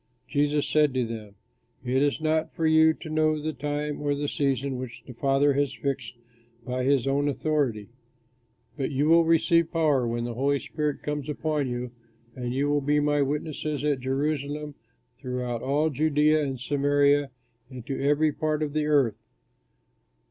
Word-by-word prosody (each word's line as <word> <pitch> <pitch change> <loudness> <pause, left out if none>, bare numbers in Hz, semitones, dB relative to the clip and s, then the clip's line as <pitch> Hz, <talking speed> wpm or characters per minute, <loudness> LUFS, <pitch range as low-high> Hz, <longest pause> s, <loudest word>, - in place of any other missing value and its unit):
Jesus 145 0 +1
said 150 -3 +2
to 125 -2 +1
them, 110 -3 -7 0.5
"It 130 +2 +1
is 145 +1 +1
not 160 0 0
for 165 - -1
you 160 0 +6
to 160 - -8
know 155 0 +2
the 155 +1 -3
time 145 +2 -3
or 145 -1 0
the 145 +1 -2
season 135 -2 -1
which 125 -2 -8
the 125 - -10
Father 135 +3 +2
has 140 -1 0
fixed 135 -4 -3 0.5
by 125 0 -2
his 135 -1 +2
own 140 +1 +1
authority; 140 -8 -1 0.9
but 135 -3 -2
you 145 +1 0
will 165 +1 +6
receive 165 0 +3
power 150 -7 +2
when 120 0 -2
the 120 0 -3
Holy 140 +4 +1
Spirit 150 +1 -3
comes 150 -1 -3
upon 150 -2 -1
you, 120 0 -4 0.4
and 125 -1 -4
you 135 +3 0
will 145 0 +1
be 145 +2 +2
my 145 0 +2
witnesses 150 0 -2
at 145 -3 +1
Jerusalem, 145 +2 -2 0.5
throughout 125 -2 -3
all 150 +4 +1
Judea 150 +2 +2
and 135 -3 -3
Samaria 145 +1 +2 0.4
and 125 -3 -9
to 135 - -4
every 150 +2 +3
part 155 +1 -1
of 145 -2 -3
the 155 -1 0
earth." 140 -8 +2
145 Hz, 170 wpm, -26 LUFS, 130-150 Hz, 0.9 s, you